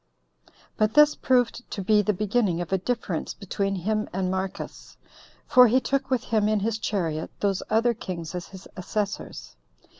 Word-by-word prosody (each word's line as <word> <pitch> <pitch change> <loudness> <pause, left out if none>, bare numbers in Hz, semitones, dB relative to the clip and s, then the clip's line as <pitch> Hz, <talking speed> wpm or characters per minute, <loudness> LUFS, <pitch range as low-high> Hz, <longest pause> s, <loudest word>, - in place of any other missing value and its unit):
But 215 0 +1
this 300 0 +7
proved 245 -1 0
to 195 - -4
be 210 +2 +4
the 210 - +1
beginning 205 -2 0
of 175 +1 -4
a 190 - +2
difference 210 -5 -3
between 195 0 -2
him 215 +4 -1
and 185 0 -1
Marcus; 190 0 -5 0.5
for 250 -1 +7
he 250 +4 +4
took 270 +1 -1
with 255 -2 +1
him 215 -2 +1
in 215 -2 +1
his 220 +1 -1
chariot 165 -8 -2
those 195 -2 0
other 230 +2 +3
kings 175 -6 -6
as 180 -1 -5
his 190 -1 -12
assessors. 190 - -4
205 Hz, 170 wpm, -25 LUFS, 185-230 Hz, 0.5 s, this